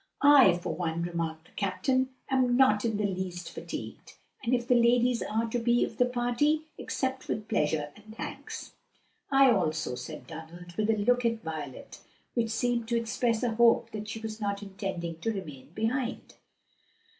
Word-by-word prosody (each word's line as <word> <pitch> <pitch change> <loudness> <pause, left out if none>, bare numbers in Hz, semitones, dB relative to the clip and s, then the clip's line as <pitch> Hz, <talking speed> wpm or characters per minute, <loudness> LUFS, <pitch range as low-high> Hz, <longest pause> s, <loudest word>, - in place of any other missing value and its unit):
"I 275 -11 +8
for 175 - -3
one," 170 -1 -2
remarked 165 -2 -3
the - - -22
captain, 210 +7 0 0.2
"am 255 -2 +2
not 210 -6 +5
in 225 -3 0
the 210 - 0
least 185 -2 -3
fatigued, - - -7 0.3
and 235 - -1
if 240 -1 +1
the 250 - +5
ladies 240 0 +4
are 225 +2 -1
to 245 - 0
be 240 +1 +3
of - - -10
the 250 - +4
party, 250 +6 +1 0.2
accept 260 0 -2
with 215 -1 -3
pleasure 150 -4 0
and 215 +1 -14
thanks." - - -6 0.6
"I 270 -1 +6
also," 160 - 0
said 125 0 -7
Donald, 170 +2 -10
with 215 0 0
a 220 - +3
look 245 +4 +2
at 230 -1 0
Violet 150 -5 -6 0.3
which 230 -2 0
seemed 235 +1 0
to 235 0 +1
express 230 0 0
a 235 -2 +1
hope 230 0 +4
that 215 0 -5
she 215 +2 -5
was 220 0 -6
not 200 0 -2
intending 190 -4 -5
to 225 +6 -1
remain 150 -11 -7
behind. 235 +3 -2
220 Hz, 175 wpm, -29 LUFS, 175-245 Hz, 0.6 s, I